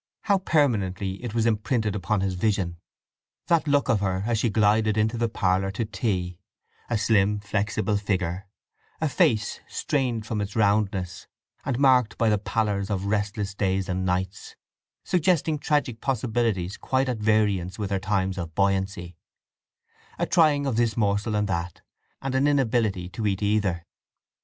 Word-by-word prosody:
How 200 -2 +2
permanently 100 - 0
it 115 -2 -5
was 115 -1 +2
imprinted 110 -1 0
upon 100 +1 0
his 95 -1 0
vision; 90 -2 -1 0.7
that 165 -2 +2
look 145 0 +2
of 115 -6 +2
her 95 -1 -1
as 115 -2 0
she 115 - +1
glided 110 0 +2
into 110 +2 +1
the 115 0 0
parlour 95 -1 +1
to 115 +3 -2
tea; 95 -4 -2 0.5
a 120 - +1
slim 105 -1 +2
flexible 105 0 -1
figure; 95 -2 -2 0.5
a 160 - +1
face, 110 -6 +1
strained 125 -6 -1
from 110 -1 -2
its 100 0 -5
roundness, 100 -4 0 0.4
and 130 -3 -1
marked 130 -4 +3
by 115 - +2
the 105 -1 +2
pallors 100 -2 -1
of 100 -2 -2
restless 100 0 -1
days 95 -1 0
and 95 0 -2
nights, 95 +1 -2 0.5
suggesting 165 -3 +1
tragic 145 -6 0
possibilities 115 -7 -1
quite 130 0 0
at 125 -3 -2
variance 105 -4 +1
with 105 -2 -4
her 100 - +1
times 95 -2 -1
of 80 -2 -6
buoyancy; 95 -2 0 1.0
a - - 0
trying 150 -4 +3
of 130 -5 -1
this 115 -2 +1
morsel 105 0 +1
and 105 0 +1
that, 85 -2 -3 0.4
and 135 -1 -2
an 135 +2 +3
inability 115 -9 +1
to 105 +4 -3
eat 100 0 -1
either. 100 -5 0
105 Hz, 155 wpm, -25 LUFS, 95-115 Hz, 1.0 s, marked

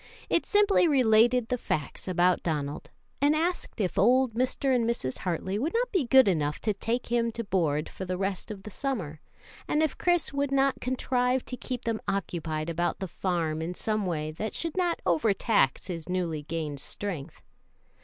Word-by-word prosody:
It - - +2
simply 410 -3 +4
related 240 -3 +4
the 250 - 0
facts 150 -2 -3
about 180 0 +3
Donald, 150 -3 -3 0.3
and 290 +2 +4
asked 340 -4 -2
if 190 -4 0
old 250 +3 +4
Mr. 255 +3 +1
and 235 -2 +1
Mrs. 130 - -2
Hartley 190 +3 -2
would 310 - -1
not - - +1
be 370 -9 +1
good 265 -1 +6
enough 150 -5 +1
to 215 - +1
take 230 +4 -2
him 235 -1 +2
to 230 - -3
board 160 -7 0
for - - -7
the 185 0 -3
rest 195 0 -3
of 200 -3 -7
the 210 - -8
summer, 185 - -3 0.5
and 300 +1 +2
if 310 - -1
Chris 350 -5 +2
would 280 0 0
not 275 0 +2
contrive 250 0 0
to 250 - -5
keep 250 -1 -5
him 225 -1 -1
occupied 170 -5 -2
about 170 +1 -1
the 190 - -4
farm 165 -3 -1
in 170 +2 -4
some 215 -1 -1
way 155 -3 -2
that 210 +8 -4
should 330 -2 -2
not 355 -2 0
overtax 185 - +2
his 170 -2 -6
newly 175 -4 -1
gained 150 -2 -4
strength. 165 -3 -5
210 Hz, 185 wpm, -28 LUFS, 170-255 Hz, 0.5 s, good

